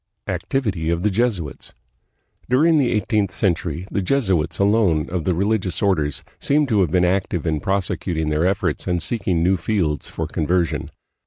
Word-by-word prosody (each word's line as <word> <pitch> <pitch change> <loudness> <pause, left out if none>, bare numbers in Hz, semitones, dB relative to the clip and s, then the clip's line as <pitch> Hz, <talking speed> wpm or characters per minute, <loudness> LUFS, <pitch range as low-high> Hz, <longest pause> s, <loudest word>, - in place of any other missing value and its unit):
Activity 100 -12 -2
of 85 +1 0
the 105 - +2
Jesuits. 95 - -2 0.8
During 155 +5 +4
the 130 -4 +2
eighteenth 105 -2 +1
century 90 -4 -1
the 100 - 0
Jesuits 90 - 0
alone 100 -7 +2
of 90 -3 -2
the 90 - +1
religious 100 0 0
orders 75 -8 0 0.2
seemed 145 0 +1
to 105 -4 +3
have 90 - +2
been 90 +2 +3
active 90 -2 0
in 80 -2 0
prosecuting 90 -3 -1
their 75 +3 +1
efforts 95 -4 -1
and 90 -1 +1
seeking 90 -2 -1
new 95 +2 +3
fields 85 -6 -1
for - - -4
conversion. 85 +2 -1
95 Hz, 160 wpm, -21 LUFS, 85-105 Hz, 0.8 s, During